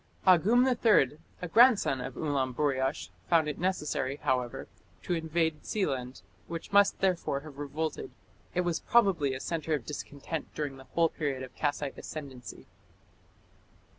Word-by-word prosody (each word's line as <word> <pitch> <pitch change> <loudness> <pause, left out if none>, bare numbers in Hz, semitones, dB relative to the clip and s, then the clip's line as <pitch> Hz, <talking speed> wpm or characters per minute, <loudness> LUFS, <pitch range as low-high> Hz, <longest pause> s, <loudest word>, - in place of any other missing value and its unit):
Agum 200 +8 +5
III, 215 - +3 0.2
a - - -2
grandson 220 - +5
of 125 0 -6
Ulamburiash, 135 -2 -1 0.2
found 165 -3 +4
it 150 - -4
necessary, 150 -6 -1
however, 130 -4 -2 0.4
to - - -1
invade 160 -1 0
Sealand, 135 - -2 0.2
which 165 -1 -6
must 200 0 +4
therefore 180 -7 0
have 145 -2 -12
revolted. 150 +2 -3 0.5
It 180 - +3
was 175 -2 -1
probably 180 - +3
a - - -5
centre 160 +1 -1
of 135 - -6
discontent 150 +2 -6
during 145 -3 -3
the 130 - -13
whole 165 -1 +4
period 140 -5 -3
of 130 -1 -10
Kassite 145 -1 -2
ascendancy. 135 -5 -8
150 Hz, 135 wpm, -30 LUFS, 135-175 Hz, 0.5 s, Agum